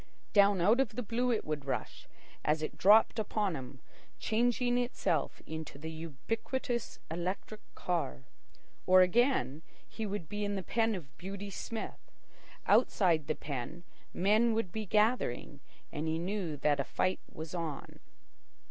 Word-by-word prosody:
Down 200 -2 +5
out 215 +8 +5
of 235 -5 +1
the 250 - -2
blue 235 +3 0
it 225 - 0
would 150 -2 -3
rush, 135 - -4 0.4
as 155 +1 +1
it - - -3
dropped 220 +3 +6
upon 210 -3 0
him 130 -1 -8 0.4
changing 245 +2 +1
itself 245 0 -1
into 160 -2 -6
the 160 +3 -6
ubiquitous 225 - -3
electric 185 +5 -3
car. 65 - -2 0.6
Or 185 0 +8
again, 180 - +3 0.3
he 220 -2 -4
would 200 -5 -4
be 210 +4 -3
in 205 0 -1
the 190 - -3
pen 225 +2 +1
of 150 -5 -9
Beauty 200 +2 -6
Smith. 225 +3 -6 0.6
Outside 165 -7 +3
the 155 - 0
pen, 145 +4 -5 0.3
men 215 +5 +3
would 225 -6 -1
be 215 +1 -4
gathering, 210 - +1 0.3
and 160 0 -3
he 160 0 +1
knew 175 -3 -2
that 145 +1 +2
a - - +2
fight 185 - 0
was 160 -1 -7
on. 165 -5 -5
190 Hz, 150 wpm, -32 LUFS, 160-220 Hz, 0.6 s, Or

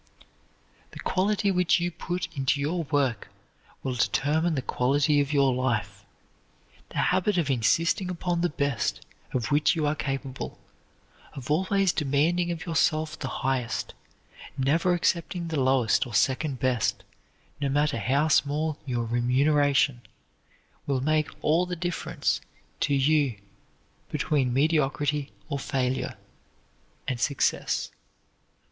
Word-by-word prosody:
The - - -9
quality 200 +2 +1
which 180 -1 +3
you 175 +1 -1
put 180 +2 -4
into 135 +1 +1
your 160 +4 -1
work 135 -6 0 0.6
will 130 - -1
determine 155 +6 +1
the 130 - -2
quality 145 +3 +2
of 140 0 -2
your 140 -3 +3
life. 105 -6 -2 0.9
The - - -9 0.2
habit 185 +2 +1
of 155 -5 +1
insisting 165 - +1
upon 175 -1 -1
the 175 - +2
best 140 -4 -1 0.3
of 120 -5 -2
which 150 +3 +3
you 155 -2 0
are 145 - +2
capable, 135 -2 -4 0.8
of 135 +1 -6
always 190 +3 +2
demanding 160 +5 +1
of 165 -1 -4
yourself 155 -2 0
the - - -3
highest, 130 -4 -2 0.6
never 165 +7 +2
accepting 170 0 -1
the 155 -4 0
lowest 130 -3 +2
or 115 - -6
second 135 +5 +1
best, 125 -4 0 0.6
no 140 - +1
matter 145 -3 +1
how 135 +9 +2
small 150 0 +1
your 120 -2 -1
remuneration, 135 +2 +2 0.9
will 135 -2 0
make 155 +2 +1
all 165 +4 +3
the 180 - -3
difference 175 0 -2 0.4
to 140 - +1
you 140 -3 +2 0.7
between 135 -5 0
mediocrity 145 0 +1 0.2
or 140 -3 -3
failure, 130 -1 -2 0.9
and 125 -2 -2
success. 140 +2 0
145 Hz, 125 wpm, -27 LUFS, 130-165 Hz, 0.9 s, which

